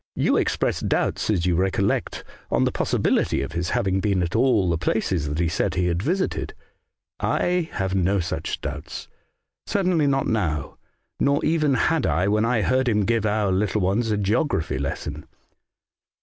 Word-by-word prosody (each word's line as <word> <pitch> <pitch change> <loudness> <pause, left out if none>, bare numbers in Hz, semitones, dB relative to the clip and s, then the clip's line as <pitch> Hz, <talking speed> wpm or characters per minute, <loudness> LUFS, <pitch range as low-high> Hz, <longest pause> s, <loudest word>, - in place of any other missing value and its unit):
You - - +2
ex - - 0
pressed - - -1
doubts, - - 0
as 90 -5 +1
you 90 - +2
recollect, 95 +3 0 0.3
on - - +2
the - - +1
possibility 70 - +1
of 70 - -5
his 85 0 -2
having 95 -6 0
been 95 -2 +1
at 85 +4 -3
all 115 -5 +3
the 85 -1 +1
places 85 -4 0
that 75 - -3
he 85 0 +1
said 85 - -1
he 90 - +1
had 85 0 0
visited* 185 - -2 0.6
I 175 -2 0
have 95 -1 -2
no 95 +1 +2
such 85 -2 -3
doubts; - - -6 0.6
certainly 180 -7 +1
not 135 -1 +1
now, 80 -10 -1 0.4
nor 140 +1 +2
even 155 -3 +2
had 160 +4 +1
I 90 +3 +1
when 105 +2 +2
I 115 -2 +1
heard 130 0 +2
him 105 -3 +1
give 115 -1 +1
our 105 -2 +1
little 100 +2 0
ones 100 +5 +1
a 105 - +1
geography 100 - 0
lesson. 75 +2 -5
100 Hz, 175 wpm, -23 LUFS, 90-125 Hz, 0.6 s, all